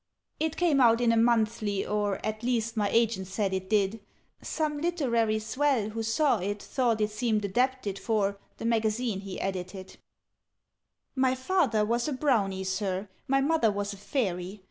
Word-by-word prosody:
"It 320 0 -1
came 320 -6 +3
out 230 -2 +5
in 240 -1 +3
a - - +3
'Monthly,' 225 -3 +1
or 205 -2 0
At 215 0 -3
least 235 -2 -1
my 205 -2 +1
agent 225 -4 +1
said 195 0 -1
it 190 0 -3
did: 210 0 +1 0.4
Some 300 -2 -2
literary 245 -10 +1
swell, 235 0 0
who 225 +1 -4
saw 225 +2 +2
It, 205 +3 -3
thought 235 -1 0
it 210 0 +1
seemed 215 -1 0
adapted 240 -1 0
for 200 -3 0 0.2
The - - -6
Magazine 225 -1 0
he 195 -1 -7
edited. 185 0 -5 1.2
"My 260 -1 +2
father 260 - +1
was 235 +4 0
a 300 - -1
Brownie, 215 -9 +1
Sir; 190 +1 -2 0.2
My 270 +1 +3
mother 285 -6 +3
was 205 0 -3
a - - -10
Fairy. 195 -3 -2
220 Hz, 165 wpm, -28 LUFS, 200-250 Hz, 1.2 s, out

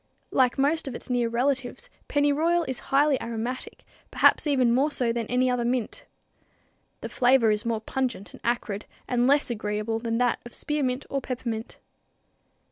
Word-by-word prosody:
Like 255 -1 +3
most 290 +3 +1
of 260 - -5
its 255 - -6
near 240 -2 +1
relatives, 265 - -1 0.2
pennyroyal 300 +4 +2
is 260 - -3
highly 280 0 +3
aromatic, 235 +2 -5 0.3
perhaps - - +4
even 255 -5 +3
more 270 +5 +3
so 245 -5 0
than 230 -2 -3
any 250 +1 +2
other 250 -1 +1
mint. 240 -1 -2 0.9
The - - -4
flavor 245 -3 +4
is 210 +2 -1
more 225 -2 -1
pungent 240 -4 -3
and - - -13
acrid 230 -4 -2 0.2
and 245 0 +2
less 280 -2 +3
agreeable 215 0 -2
than 230 0 -2
that 245 0 +1
of 240 - -10
spearmint 275 -3 -1
or 275 - -1
peppermint. 235 -3 -5
250 Hz, 160 wpm, -26 LUFS, 230-275 Hz, 0.9 s, perhaps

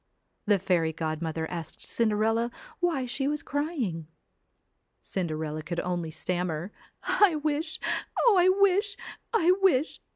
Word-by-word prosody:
The 205 -1 +5
fairy 175 -4 +1
godmother 160 0 -2
asked 170 -3 -6
Cinderella 225 +1 +1 0.3
why 335 -7 +1
she 270 +3 -2
was 300 +1 -1
crying. 275 - -2 1.0
Cinderella 155 -4 -3
could 170 +2 -4
only 175 -2 -2
stammer 175 +2 -2 0.3
'I 400 -6 +4
wish 310 +1 -1 0.5
Oh, 465 -4 +7
I 365 0 +6
wish... 395 +1 +3 0.3
I 360 -6 +4
wish 320 -6 +3
220 Hz, 120 wpm, -28 LUFS, -, 1.0 s, Oh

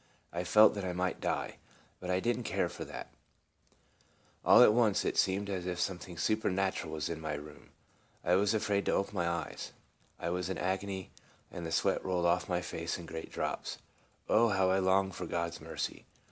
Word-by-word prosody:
I 85 +1 -1
felt 105 +5 +6
that 100 - -4
I 90 -1 -2
might 90 0 -1
die, - - -2 0.4
but 90 - -6
I 90 0 +2
did 120 +4 +1
n't - - -5
care - - 0
for - - -7
that - - -8 1.3
All - - +8
at 105 - +7
once 110 -4 +3
it - - 0
seemed 95 +2 +2
as 95 -2 -3
if 90 -1 -2
something 90 -1 -3
su 110 +6 +2
pernatural 95 -5 -1
was 80 -1 -2
in 80 -1 -4
my 75 -1 -2
room. 75 0 -10 0.5
I 90 - +2
was 100 +3 +3
afraid 100 -2 0
to - - +3
open 100 - 0
my 85 -3 0
eyes. 85 -3 -4 0.5
I 85 - -2
was 90 0 -2
in 95 - -2
an - - -4
agony, 95 0 -2 0.4
and 85 -1 -5
the - - -5
sweat 95 +3 +1
rolled 90 -2 0
off 85 +2 +2
my 90 -1 +1
face 80 0 -3
in 85 - -8
great 80 0 -7
drops. - - -3 0.5
Oh, 115 +1 +4
how 95 -2 +3
I 95 - +3
longed 95 0 +2
for - - -5
God's 85 0 -2
mercy! - - -5
95 Hz, 205 wpm, -32 LUFS, 85-100 Hz, 1.3 s, All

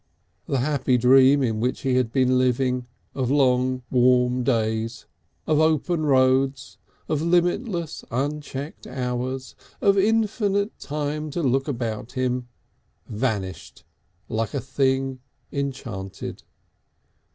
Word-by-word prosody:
The 135 - 0
happy 135 -2 +1
dream 135 +3 +6
in 110 -3 0
which 125 +3 -1
he 135 -1 0
had 125 -3 +1
been 130 -1 +3
living 125 0 +1 0.3
of 130 -3 -1
long 130 -2 +2
warm 125 0 +3
days, 115 -1 -1 0.4
of 155 - +2
open 155 +1 +2
roads, 130 -5 +2 0.3
of 155 -2 0
limitless 175 - 0
unchecked 145 +2 -4
hours, 130 +1 -3 0.3
of 200 -1 +4
infinite 210 -1 +1
time 150 +1 -3
to 165 +3 -3
look 135 +1 +1
about 115 -4 -4
him, 125 -1 -1 0.6
vanished 105 -7 -3 0.4
like 110 +2 -2
a - - +1
thing 135 0 0 0.3
enchanted. 125 -9 -5
130 Hz, 110 wpm, -24 LUFS, 125-145 Hz, 0.6 s, dream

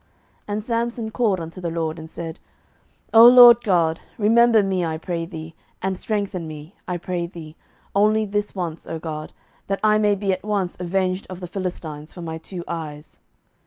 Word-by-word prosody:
07:016:028 - - -39 0.5
And 215 0 -4
Samson 235 -1 -2
called 215 -6 +1
unto 165 +3 -8
the 170 - -2
LORD, 165 0 -3
and 160 0 -9
said, 165 -1 -7 0.7
O 230 +1 +10
Lord 240 -1 +9
God, 170 -6 +2 0.2
remember 225 0 +5
me, 190 -2 0
I 160 -1 -2
pray 165 0 -4
thee, 160 -2 -8 0.3
and 190 0 -1
strengthen 195 -4 -3
me, 155 +3 -9
I 180 - -2
pray 175 0 -3
thee, 160 -3 -11 0.4
only 215 +2 +3
this 205 0 -2
once, 170 -4 -4
O 165 - -4
God, 155 -1 -6 0.4
that 195 0 -1
I 215 0 +4
may 210 -1 +3
be 195 -1 0
at 185 - -5
once 200 -4 -1
avenged 185 +1 -1
of 185 -1 -7
the 180 - -6
Philistines 170 -5 -6
for 175 - -8
my 160 -1 -5
two 175 +1 -7
eyes. 155 -3 -7
185 Hz, 185 wpm, -22 LUFS, 165-210 Hz, 0.7 s, O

